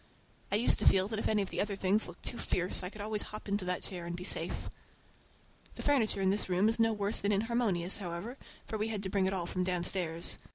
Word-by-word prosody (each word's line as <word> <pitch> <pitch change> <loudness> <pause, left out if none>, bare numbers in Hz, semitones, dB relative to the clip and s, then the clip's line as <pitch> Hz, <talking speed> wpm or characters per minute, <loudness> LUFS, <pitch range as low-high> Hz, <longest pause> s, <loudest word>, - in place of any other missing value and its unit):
I - - +3
used 225 +4 +3
to - - +2
feel 190 0 +5
that 220 -1 -2
if - - 0
any 210 -2 +2
of 190 - -7
the - - 0
other 205 -1 -1
things 195 +3 +2
looked - - -11
too 240 - -4
fierce 180 +1 0
I 180 - -4
could 210 +1 -9
always 210 0 -1
hop 215 0 -7
into 200 -1 0
that 180 0 0
chair 175 -3 -5
and 170 - -3
be 180 - -6
safe. - - -2 1.1
The - - -6
furniture 235 -8 +2
in 190 0 +3
this 200 -1 0
room 185 +3 +3
is 225 +1 +1
no 225 0 +4
worse 205 -1 -1
than 200 - +2
inharmonious, 205 -4 +1
however, 190 +7 -5 0.3
for 220 - -4
we 215 - 0
had 210 -3 -3
to 190 - -2
bring 190 -1 +2
it 190 - 0
all 180 -3 -1
from 180 +1 -1
downstairs. 175 -2 +1
200 Hz, 250 wpm, -32 LUFS, 180-215 Hz, 1.1 s, feel